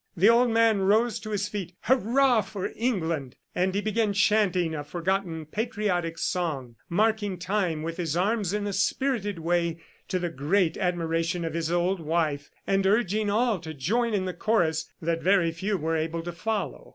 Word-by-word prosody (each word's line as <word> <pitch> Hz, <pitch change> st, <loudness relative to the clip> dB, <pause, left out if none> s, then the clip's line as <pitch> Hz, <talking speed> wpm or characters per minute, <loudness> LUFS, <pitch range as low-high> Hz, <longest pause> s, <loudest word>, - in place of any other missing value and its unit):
The 195 Hz, +6 st, +6 dB
old 240 Hz, +1 st, +4 dB
man 225 Hz, -2 st, +4 dB
rose 215 Hz, +4 st, +2 dB
to 215 Hz, -, -8 dB
his 205 Hz, -1 st, -1 dB
feet: 185 Hz, -4 st, -5 dB
"Hurrah 250 Hz, 0 st, +3 dB
for 195 Hz, -1 st, -5 dB
England!" 165 Hz, -, -1 dB, 0.2 s
and 185 Hz, +1 st, 0 dB
he 200 Hz, -, +1 dB
began 215 Hz, 0 st, 0 dB
chanting 195 Hz, -5 st, +2 dB
a 150 Hz, -2 st, -3 dB
forgotten 175 Hz, 0 st, -2 dB
patriotic 185 Hz, -3 st, -2 dB
song, 145 Hz, -11 st, -2 dB
marking 205 Hz, 0 st, +1 dB
time 180 Hz, -4 st, -1 dB
with 165 Hz, +1 st, -4 dB
his 165 Hz, -3 st, -1 dB
arms 200 Hz, 0 st, +1 dB
in 210 Hz, 0 st, -1 dB
a 205 Hz, -, -2 dB
spirited 205 Hz, 0 st, 0 dB
way, 170 Hz, 0 st, 0 dB, 0.3 s
to 185 Hz, -, -1 dB
the 175 Hz, -1 st, -2 dB
great 160 Hz, +5 st, +1 dB
admiration 170 Hz, -2 st, -1 dB
of 165 Hz, -, -3 dB
his 165 Hz, 0 st, -2 dB
old 175 Hz, +2 st, +1 dB
wife, 155 Hz, -3 st, -1 dB, 0.2 s
and 195 Hz, 0 st, +2 dB
urging 210 Hz, 0 st, +2 dB
all 220 Hz, -1 st, +2 dB
to 160 Hz, -1 st, -8 dB
join 220 Hz, -, 0 dB
in 190 Hz, -2 st, 0 dB
the 185 Hz, -, -3 dB
chorus 175 Hz, -5 st, 0 dB
that 165 Hz, 0 st, 0 dB
very 185 Hz, -3 st, +3 dB
few 190 Hz, +5 st, -2 dB
were 165 Hz, 0 st, -1 dB
able 165 Hz, +1 st, -2 dB
to 175 Hz, -, -4 dB
follow. 210 Hz, +5 st, -3 dB
185 Hz, 175 wpm, -27 LUFS, 165-210 Hz, 0.3 s, The